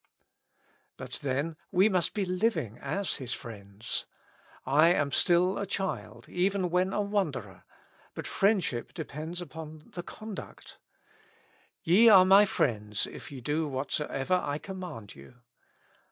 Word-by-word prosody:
But 125 -1 -6
then 145 +3 -1
we 190 +2 +5
must 185 -5 0
be 205 -2 0
living 180 - -1
as 180 +8 -2
His 125 -3 -4
friends. 100 -2 -6 0.6
I 145 +5 +5
am 145 -5 +2
still 180 +6 +3
a 200 - -3
child, 195 0 -4
even 185 0 0
when 180 +2 +2
a 210 - 0
wanderer; 160 - -2 0.5
but - - -5
friendship 190 - +1
depends 160 +1 -5
upon 155 -1 -9
the 175 - -4
conduct. 215 +3 -9 1.0
"Ye 205 +8 +7
are 190 -3 +9
my 195 +2 +7
friends 105 - 0
if - - -10
ye 135 -3 -8
do 150 +5 0
whatsoever 145 +4 -1
I 145 0 -1
command 175 - -8
you." 70 - -15
165 Hz, 130 wpm, -29 LUFS, 135-190 Hz, 1.0 s, are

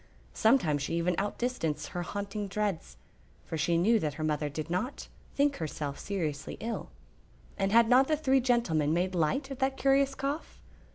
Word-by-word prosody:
Sometimes 195 - +3
she 145 - -2
even 170 +1 +1
outdistanced 200 -8 -2
her 175 - -4
haunting 200 +3 -4
dreads, 190 - -3 0.5
for - - -5
she 165 +2 +1
knew 220 +7 +4
that 150 -6 -2
her 155 - -4
mother 150 -1 0
did 155 +2 -5
not 185 +10 -3 0.3
think 285 0 +2
herself 150 -3 -4
seriously 155 -8 -3
ill; 230 +1 -4 0.7
and 195 -1 0
had 230 +1 +6
not 255 +3 +5
the 310 - +2
three 270 -3 +3
gentlemen 170 - +2
made 185 +2 0
light 185 - 0
of 270 - -6
that 265 0 0
curious 275 0 +3
cough? 280 +3 -4
195 Hz, 170 wpm, -30 LUFS, 160-250 Hz, 0.7 s, had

